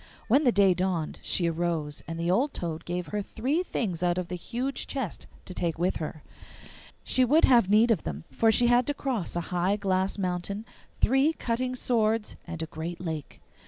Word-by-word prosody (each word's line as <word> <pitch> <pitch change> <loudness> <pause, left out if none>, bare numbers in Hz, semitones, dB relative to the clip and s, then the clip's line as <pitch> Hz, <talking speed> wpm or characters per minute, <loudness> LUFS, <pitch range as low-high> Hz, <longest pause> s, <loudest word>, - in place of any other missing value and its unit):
When 275 +6 +4
the 245 - +6
day 200 -3 +5
dawned 180 -3 -2
she 175 - +1
arose, 165 -3 -2
and 165 +1 -5
the 170 +1 +1
old 265 +9 +1
toad 165 -2 -4
gave 175 0 -3
her 210 0 -1
three 260 - -1
things 190 - -2
out 175 0 +1
of 180 -2 -3
the 180 - -3
huge 245 +9 -3
chest 260 - -4 0.2
to 185 - -7
take 170 -3 -1
with 180 +3 0
her. 155 -1 -6 0.8
She 255 - +3
would 295 +6 +5
have 235 -7 +5
need 220 +3 +5
of 195 -9 +2
them, 75 0 -5
for 225 +12 +3
she 240 +3 +4
had 245 +1 +4
to 290 - 0
cross 245 - -2
a 175 - 0
high 180 +3 +2
glass 190 -1 0
mountain, 195 +3 -3 0.3
three 270 +6 +3
cutting 255 -2 -2
swords, 225 -3 +1
and 165 -1 -5
a - - -2
great 165 +2 -6
lake. 160 -5 -6
190 Hz, 195 wpm, -28 LUFS, 170-240 Hz, 0.8 s, the